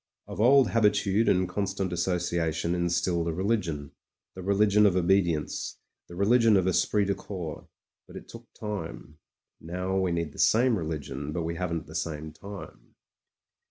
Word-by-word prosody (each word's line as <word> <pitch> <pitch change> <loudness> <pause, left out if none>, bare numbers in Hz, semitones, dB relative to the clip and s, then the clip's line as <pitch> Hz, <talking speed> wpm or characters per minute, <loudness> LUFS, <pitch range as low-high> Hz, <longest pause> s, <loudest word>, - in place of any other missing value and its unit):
Of - - -5
old 130 -1 +6
habitude 105 -1 +2
and 90 0 +2
constant 95 0 -2
associa 85 -2 0
tion 85 +1 -1
instilled 85 -1 0
a - - 0
religion 85 -6 -1 0.2
— - - -64
the 95 - -8
religion 100 +2 +4
of 95 - +1
obedience, 85 -4 0 0.3
the 85 - -11
religion 110 +2 +4
of 95 -1 +1
esprit 100 +2 +2
de 100 - +1
corps. 90 -6 -7 0.4
But - - -14
it - - -9
took - - -13
time. 85 -7 -6 0.4
Now 90 +3 -3
we 95 -2 0
need 85 -3 -2
the - - -14
same 120 +1 +4
religion, 75 -5 -4
but 85 +2 -2
we 85 +1 -2
haven't 85 -1 -3
the 80 - -12
same 80 -2 -4
time. 100 +4 -11
90 Hz, 160 wpm, -27 LUFS, 85-100 Hz, 0.4 s, old